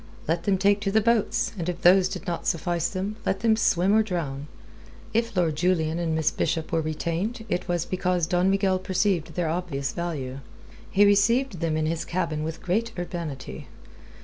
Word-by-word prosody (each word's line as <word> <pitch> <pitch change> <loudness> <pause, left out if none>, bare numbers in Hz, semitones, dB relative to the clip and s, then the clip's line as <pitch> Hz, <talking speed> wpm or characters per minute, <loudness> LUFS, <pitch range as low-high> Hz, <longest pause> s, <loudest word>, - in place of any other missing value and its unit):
Let 165 +2 0
them 195 -2 +3
take 200 +2 +3
to 200 -1 -1
the 220 - +4
boats, 230 0 +1
and 170 +1 -2
if 175 - -5
those 185 +1 +6
did - - -6
not 175 -3 -3
suffice 170 0 0
them, 200 +3 -4
let 190 - -1
them 225 -1 +4
swim 195 -3 +2
or 220 - +5
drown. 155 -9 -3 0.7
If 230 -2 0
Lord 165 -4 +2
Julian 165 -1 +1
and 165 -2 0
Miss 160 -1 +2
Bishop 160 0 -2
were 165 - +2
retained, 170 +9 -3
it 180 - -1
was 175 -2 0
because 180 -2 0
Don 180 +2 +2
Miguel 195 -1 +2
perceived 185 -2 0
their 175 -2 0
obvious 155 -6 -2
value. 140 -7 -4 0.5
He 205 +1 +5
received 205 +2 +3
them 160 -2 0
in 155 - 0
his 165 +1 -1
cabin 170 -4 -2
with 160 +1 -5
great 220 +6 0
urbanity. 160 - -5
175 Hz, 185 wpm, -25 LUFS, 160-195 Hz, 0.7 s, those